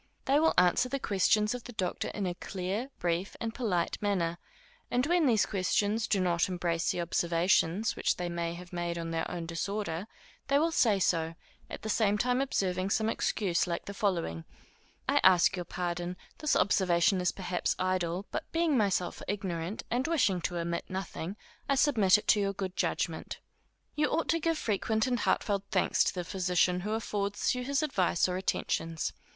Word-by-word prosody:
They 280 Hz, +2 st, +4 dB
will 320 Hz, +1 st, +3 dB
answer 180 Hz, +8 st, +4 dB
the 275 Hz, -, -1 dB
questions 210 Hz, -1 st, +2 dB
of 250 Hz, -1 st, -7 dB
the 245 Hz, -, -8 dB
doctor 185 Hz, -4 st, -2 dB
in 205 Hz, -, -3 dB
a 180 Hz, -, -1 dB
clear, 195 Hz, +7 st, -4 dB
brief, 175 Hz, +2 st, -1 dB
and 225 Hz, -1 st, -3 dB
polite 195 Hz, -10 st, -1 dB
manner; 175 Hz, -5 st, 0 dB, 0.5 s
and 250 Hz, +2 st, +1 dB
when 340 Hz, -1 st, +3 dB
these 225 Hz, -4 st, +4 dB
questions 205 Hz, +3 st, 0 dB
do 200 Hz, -, +2 dB
not 175 Hz, -1 st, +1 dB
embrace 175 Hz, -2 st, -1 dB
the -, -, -1 dB
observations 175 Hz, +4 st, +1 dB
which -, -, 0 dB
they 180 Hz, -, -2 dB
may 170 Hz, -1 st, -3 dB
have 180 Hz, +1 st, -11 dB
made 175 Hz, -1 st, -2 dB
on 165 Hz, 0 st, -4 dB
their 165 Hz, 0 st, -2 dB
own 175 Hz, -2 st, -4 dB
disorder, 170 Hz, +2 st, -3 dB, 0.4 s
they 280 Hz, -, +3 dB
will 325 Hz, +3 st, +2 dB
say 225 Hz, -10 st, +3 dB
so, 165 Hz, -3 st, +1 dB, 0.3 s
at -, -, -8 dB
the -, -, -4 dB
same 210 Hz, -1 st, +2 dB
time 250 Hz, +4 st, +1 dB
observing 185 Hz, -8 st, 0 dB
some 220 Hz, +2 st, +1 dB
excuse 190 Hz, -6 st, 0 dB
like 170 Hz, -1 st, -3 dB
the 200 Hz, -, -6 dB
following; 170 Hz, -, -1 dB, 0.6 s
_I -, -, +3 dB
ask 185 Hz, -1 st, +6 dB
your 180 Hz, -1 st, -4 dB
pardon; 175 Hz, +1 st, -3 dB, 0.2 s
this 305 Hz, -, +1 dB
observation 185 Hz, -1 st, +3 dB
is 180 Hz, -, +2 dB
perhaps 180 Hz, -2 st, -2 dB
idle, 185 Hz, 0 st, -1 dB
but -, -, -5 dB
being 330 Hz, -3 st, +2 dB
myself 195 Hz, -6 st, 0 dB
ignorant, 190 Hz, -2 st, -3 dB
and 250 Hz, +5 st, 0 dB
wishing 230 Hz, -, +2 dB
to 175 Hz, +1 st, -2 dB
omit 170 Hz, 0 st, -2 dB
nothing, 190 Hz, -1 st, -5 dB, 0.3 s
I 275 Hz, -, +4 dB
submit 225 Hz, -9 st, +5 dB
it 210 Hz, -, -8 dB
to 210 Hz, -, +6 dB
your 200 Hz, -1 st, 0 dB
good 190 Hz, -1 st, -4 dB
judgment._ -, -, -2 dB, 0.6 s
You 300 Hz, 0 st, +2 dB
ought 325 Hz, +1 st, -1 dB
to 330 Hz, -, +3 dB
give 330 Hz, 0 st, 0 dB
frequent 220 Hz, -2 st, 0 dB
and 245 Hz, -2 st, 0 dB
heartfelt 200 Hz, -2 st, 0 dB
thanks -, -, +2 dB
to -, -, 0 dB
the 180 Hz, -, -2 dB
physician 180 Hz, 0 st, +1 dB
who 210 Hz, +4 st, -3 dB
affords 205 Hz, -2 st, -1 dB
you 250 Hz, 0 st, -3 dB
his 280 Hz, +3 st, 0 dB
advice 185 Hz, -, +1 dB
or 180 Hz, -, -2 dB
attentions. 165 Hz, -3 st, -1 dB
190 Hz, 185 wpm, -30 LUFS, 175-220 Hz, 0.6 s, ask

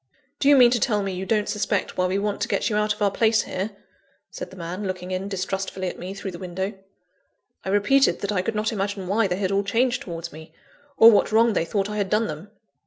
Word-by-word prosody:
"Do 280 Hz, -, +3 dB
you 290 Hz, -, +8 dB
mean 245 Hz, -2 st, +7 dB
to 245 Hz, -, +2 dB
tell 210 Hz, -3 st, +1 dB
me 195 Hz, -1 st, -3 dB
you 185 Hz, +1 st, -5 dB
don't 210 Hz, -2 st, +1 dB
suspect 205 Hz, -1 st, -1 dB
why 185 Hz, 0 st, +1 dB
we 185 Hz, +2 st, 0 dB
want 205 Hz, 0 st, -2 dB
to 215 Hz, -, 0 dB
get 235 Hz, -, 0 dB
you -, -, 0 dB
out 210 Hz, 0 st, +1 dB
of 210 Hz, 0 st, -1 dB
our 200 Hz, -, +3 dB
place 220 Hz, +1 st, +2 dB
here?" 190 Hz, +3 st, -3 dB, 0.6 s
said -, -, -7 dB
the -, -, -13 dB
man, 180 Hz, +3 st, -5 dB
looking 185 Hz, 0 st, -5 dB
in 185 Hz, +1 st, -2 dB
distrustfully 190 Hz, -1 st, -3 dB
at -, -, -9 dB
me 185 Hz, +2 st, -6 dB
through 195 Hz, -1 st, -5 dB
the 170 Hz, -, -9 dB
window. 190 Hz, +2 st, -4 dB, 0.9 s
I -, -, -4 dB
repeated 210 Hz, +8 st, +3 dB
that 200 Hz, -, -2 dB
I 190 Hz, -3 st, +1 dB
could 220 Hz, +4 st, -3 dB
not 215 Hz, +1 st, 0 dB
imagine 200 Hz, -2 st, -3 dB
why 205 Hz, +2 st, +2 dB
they 180 Hz, -1 st, -2 dB
had 190 Hz, -1 st, -1 dB
all 200 Hz, +1 st, +1 dB
changed 245 Hz, +5 st, +1 dB
towards 170 Hz, -, -7 dB
me, 160 Hz, +1 st, -12 dB, 0.4 s
or 225 Hz, +1 st, +9 dB
what 210 Hz, -, +3 dB
wrong 225 Hz, +1 st, +4 dB
they 165 Hz, -, 0 dB
thought 195 Hz, +3 st, -1 dB
I 210 Hz, 0 st, -5 dB
had 200 Hz, -2 st, -1 dB
done 215 Hz, +3 st, +2 dB
them. 155 Hz, +3 st, -7 dB
200 Hz, 250 wpm, -24 LUFS, 185-215 Hz, 0.9 s, or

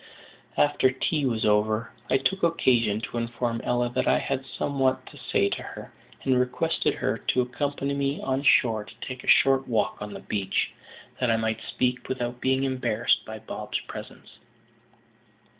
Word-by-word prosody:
After 145 Hz, -3 st, +4 dB
tea 135 Hz, +2 st, 0 dB
was 115 Hz, -3 st, 0 dB
over, 110 Hz, +1 st, +2 dB, 0.2 s
I 130 Hz, -, +4 dB
took 135 Hz, +9 st, 0 dB
occasion 120 Hz, -10 st, +2 dB
to 120 Hz, +1 st, -4 dB
inform 115 Hz, 0 st, -2 dB
Ella 120 Hz, 0 st, +1 dB
that -, -, 0 dB
I -, -, +5 dB
had 135 Hz, -1 st, -2 dB
somewhat 135 Hz, -2 st, 0 dB
to -, -, -13 dB
say 100 Hz, -, +1 dB
to -, -, -3 dB
her, -, -, -9 dB, 0.3 s
and 130 Hz, -2 st, +3 dB
requested 125 Hz, 0 st, +1 dB
her -, -, -1 dB
to 130 Hz, -, +1 dB
accompany 140 Hz, +2 st, -2 dB
me 140 Hz, 0 st, -1 dB
on 135 Hz, 0 st, -1 dB
shore 115 Hz, -6 st, +4 dB
and 105 Hz, -, -12 dB
take 130 Hz, 0 st, -6 dB
a -, -, -12 dB
short 135 Hz, 0 st, +5 dB
walk 110 Hz, -3 st, 0 dB
on 105 Hz, 0 st, -6 dB
the -, -, -6 dB
beach, 100 Hz, -3 st, -1 dB, 0.5 s
that 125 Hz, -, +1 dB
I 115 Hz, -, +3 dB
might 110 Hz, 0 st, -1 dB
speak 125 Hz, 0 st, -1 dB
without 125 Hz, -1 st, -3 dB
being 130 Hz, +1 st, +2 dB
embarrassed 130 Hz, -1 st, +1 dB
by -, -, -7 dB
Bob's -, -, -4 dB
presence. -, -, -10 dB
125 Hz, 170 wpm, -26 LUFS, 115-135 Hz, 0.5 s, I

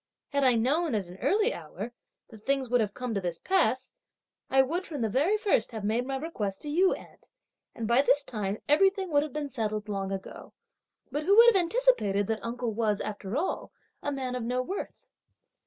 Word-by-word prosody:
Had 280 Hz, 0 st, 0 dB
I 255 Hz, -2 st, +5 dB
known, 275 Hz, +5 st, +1 dB
at 205 Hz, -3 st, -1 dB
an 180 Hz, +2 st, -12 dB
early 435 Hz, +4 st, +2 dB
hour, 240 Hz, -, -7 dB, 0.4 s
that 215 Hz, -2 st, -13 dB
things 270 Hz, -1 st, 0 dB
would 245 Hz, -1 st, +3 dB
have 205 Hz, -2 st, -2 dB
come 250 Hz, -2 st, -3 dB
to 200 Hz, -, -1 dB
this 175 Hz, -2 st, -2 dB
pass, 295 Hz, -, +1 dB, 0.6 s
I 265 Hz, 0 st, +5 dB
would, 335 Hz, +8 st, -2 dB
from 295 Hz, -6 st, -5 dB
the 225 Hz, -, +1 dB
very 300 Hz, -, +2 dB
first, 390 Hz, -, +1 dB
have 220 Hz, -2 st, -5 dB
made 230 Hz, +5 st, 0 dB
my 270 Hz, -, -2 dB
request 225 Hz, -10 st, -4 dB
to 300 Hz, -, -5 dB
you, 370 Hz, +5 st, +4 dB
aunt; -, -, -15 dB, 0.5 s
and 225 Hz, -, -3 dB
by 235 Hz, +3 st, +5 dB
this 285 Hz, 0 st, +3 dB
time 210 Hz, -5 st, -3 dB
everything 385 Hz, +4 st, +3 dB
would 290 Hz, -1 st, +4 dB
have 300 Hz, -1 st, -4 dB
been 295 Hz, 0 st, -3 dB
settled 215 Hz, -5 st, -3 dB
long 195 Hz, -2 st, -3 dB
ago! 195 Hz, -1 st, -7 dB, 0.6 s
But 295 Hz, +3 st, -2 dB
who 400 Hz, +2 st, +5 dB
would 470 Hz, 0 st, +9 dB
have 385 Hz, -, +4 dB
anticipated 340 Hz, -, +2 dB
that 220 Hz, +2 st, -2 dB
uncle 235 Hz, -1 st, -3 dB
was, 210 Hz, -2 st, 0 dB
after 205 Hz, +2 st, -4 dB
all, 355 Hz, +5 st, -2 dB, 0.3 s
a 290 Hz, -, -2 dB
man 260 Hz, -2 st, -3 dB
of 250 Hz, -, -3 dB
no 250 Hz, +2 st, -1 dB
worth!" 385 Hz, +10 st, -6 dB
255 Hz, 205 wpm, -28 LUFS, 215-310 Hz, 0.6 s, would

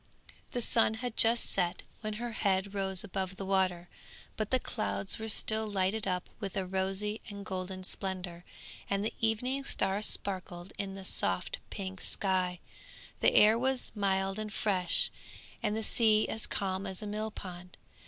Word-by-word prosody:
The 245 Hz, -, 0 dB
sun 225 Hz, -1 st, +4 dB
had 245 Hz, 0 st, -4 dB
just 230 Hz, +1 st, +5 dB
set 180 Hz, -1 st, +1 dB, 0.2 s
when 215 Hz, -1 st, -3 dB
her 235 Hz, +2 st, -4 dB
head 195 Hz, -2 st, +1 dB
rose 190 Hz, -2 st, -1 dB
above 190 Hz, -2 st, -3 dB
the 195 Hz, -, -5 dB
water, 185 Hz, -2 st, +1 dB, 0.5 s
but 215 Hz, -1 st, -2 dB
the 260 Hz, -, +3 dB
clouds 100 Hz, -, -1 dB
were 220 Hz, -, -4 dB
still 220 Hz, +1 st, +4 dB
lighted 200 Hz, +1 st, 0 dB
up 180 Hz, -1 st, -1 dB
with 200 Hz, -1 st, -4 dB
a 190 Hz, -, 0 dB
rosy 195 Hz, +3 st, -1 dB
and 200 Hz, -1 st, -7 dB
golden 185 Hz, 0 st, -4 dB
splendour, 185 Hz, -2 st, -4 dB, 0.5 s
and 200 Hz, +1 st, +1 dB
the -, -, -1 dB
evening 250 Hz, +5 st, +1 dB
star 195 Hz, -5 st, 0 dB
sparkled 185 Hz, -4 st, -2 dB
in 195 Hz, -1 st, -3 dB
the 195 Hz, -1 st, -7 dB
soft -, -, +1 dB
pink 190 Hz, -2 st, -5 dB
sky, 185 Hz, -2 st, +1 dB, 0.6 s
the -, -, +4 dB
air 215 Hz, +2 st, +7 dB
was 260 Hz, 0 st, 0 dB
mild 195 Hz, -1 st, +1 dB
and 215 Hz, -1 st, -4 dB
fresh, 190 Hz, -4 st, +1 dB, 0.5 s
and 210 Hz, -, 0 dB
the 220 Hz, -, -2 dB
sea 215 Hz, -1 st, +4 dB
as 220 Hz, -, -2 dB
calm 195 Hz, 0 st, -1 dB
as 190 Hz, +2 st, -4 dB
a -, -, -4 dB
millpond. 200 Hz, -4 st, -5 dB
195 Hz, 165 wpm, -32 LUFS, 185-215 Hz, 0.6 s, air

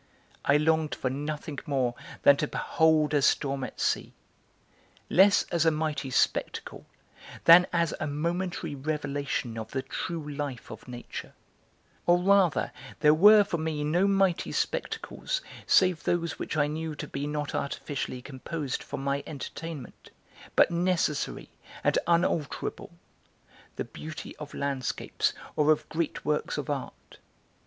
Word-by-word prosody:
I 140 Hz, -, +4 dB
longed 160 Hz, 0 st, +1 dB
for 130 Hz, -, -2 dB
nothing 150 Hz, +1 st, -4 dB
more 130 Hz, -4 st, +1 dB, 0.3 s
than 140 Hz, -, +8 dB
to 150 Hz, -, 0 dB
behold 155 Hz, -1 st, +2 dB
a 145 Hz, -, +3 dB
storm 135 Hz, -1 st, +1 dB
at -, -, -7 dB
sea, -, -, 0 dB, 1.0 s
less 195 Hz, +2 st, +6 dB
as 170 Hz, -2 st, +2 dB
a 165 Hz, -, +5 dB
mighty 155 Hz, -3 st, -2 dB
spectacle 130 Hz, -, -1 dB, 0.6 s
than 175 Hz, +2 st, +9 dB
as 170 Hz, -1 st, +1 dB
a 155 Hz, -, -2 dB
momentary 170 Hz, +2 st, -2 dB
revelation 140 Hz, -4 st, -3 dB
of 110 Hz, -, -6 dB
the 130 Hz, -1 st, -3 dB
true 165 Hz, -3 st, -4 dB
life 140 Hz, -4 st, -5 dB
of -, -, -10 dB
nature; 120 Hz, -1 st, -8 dB, 0.7 s
or 175 Hz, 0 st, +6 dB
rather 190 Hz, -2 st, +3 dB, 0.3 s
there 150 Hz, -1 st, +7 dB
were 205 Hz, +6 st, +8 dB
for 170 Hz, -4 st, -3 dB
me 155 Hz, -2 st, -2 dB
no 175 Hz, +6 st, +2 dB
mighty 195 Hz, -3 st, +2 dB
spectacles -, -, -2 dB, 0.3 s
save 185 Hz, -4 st, +4 dB
those 170 Hz, -1 st, -1 dB
which -, -, -3 dB
I 145 Hz, -, +4 dB
knew 155 Hz, +1 st, -4 dB
to -, -, -6 dB
be 140 Hz, +1 st, -4 dB
not 150 Hz, -1 st, -3 dB
artificially 140 Hz, -3 st, -3 dB
composed 140 Hz, +1 st, -4 dB
for -, -, -6 dB
my 140 Hz, +1 st, -1 dB
entertainment, 150 Hz, -2 st, -7 dB, 0.5 s
but -, -, +5 dB
necessary 170 Hz, -3 st, 0 dB, 0.3 s
and -, -, +3 dB
unalterable, 170 Hz, -4 st, 0 dB, 0.8 s
the -, -, -3 dB
beauty 160 Hz, 0 st, -8 dB
of 150 Hz, -2 st, -8 dB
landscapes 140 Hz, -2 st, -1 dB, 0.2 s
or 150 Hz, 0 st, +4 dB
of 155 Hz, -, +1 dB
great 165 Hz, -1 st, -2 dB
works 150 Hz, 0 st, 0 dB
of 150 Hz, 0 st, -3 dB
art. 140 Hz, -2 st, -7 dB
150 Hz, 140 wpm, -28 LUFS, 140-170 Hz, 1.0 s, than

